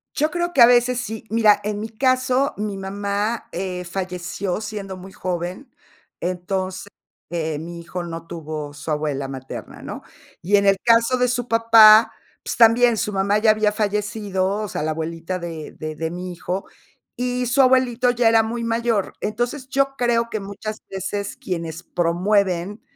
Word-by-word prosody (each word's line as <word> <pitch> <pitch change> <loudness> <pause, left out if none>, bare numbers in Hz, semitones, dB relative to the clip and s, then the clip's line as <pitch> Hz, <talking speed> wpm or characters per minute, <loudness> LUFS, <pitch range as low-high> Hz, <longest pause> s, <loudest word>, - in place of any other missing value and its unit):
Yo 305 +2 +1
creo 345 +1 -2
que 265 - +4
a - - +12
veces 245 +1 +4
sí, 220 -2 -6
mira, 220 -2 +4
en 210 0 -2
mi 220 +1 -5
caso, 255 +3 +1
mi 205 -1 -3
mamá, 200 +3 -2
eh, 180 0 -4
falleció 180 +2 -4
siendo 205 -3 -6
muy 190 +1 -11
joven, 180 +8 -4 0.5
entonces, 185 +2 -3 0.4
mi 165 0 -4
hijo 175 +1 -5
no 165 -1 -7
tuvo 155 -3 -6
su 145 +2 -9
abuela 150 -3 -1
materna, 135 -1 -8
¿no? - - -7 0.4
Y 195 +5 +2
en 200 0 +3
el 195 -1 +5
caso 230 +2 +4
de 250 0 +2
su 245 0 -1
papá, 225 -1 +7 0.3
pues, - - -3
también 235 +1 +5
su 210 -1 -2
mamá 200 +1 +1
ya 215 0 +5
había 215 -1 +1
fallecido, 210 -2 -1
o 210 - -3
sea, - - -3
la 155 +1 -1
abuelita 165 +3 -4
de 165 -3 -7
de 155 0 -6
de 160 +1 -3
mi 180 +2 -6
hijo, 180 +2 -4 0.5
y 250 0 -1
su 260 +3 +4
abuelito 255 -1 +3
ya 240 -1 +3
era 225 0 +5
muy 235 +2 -3
mayor. 230 -3 0
Entonces, 240 +5 -2
yo 275 0 0
creo 235 -1 +1
que 220 - -3
muchas 205 +2 -6
veces 200 +1 -4
quienes 170 -2 -5
promueven, 180 +3 0
205 Hz, 165 wpm, -22 LUFS, 180-230 Hz, 0.5 s, a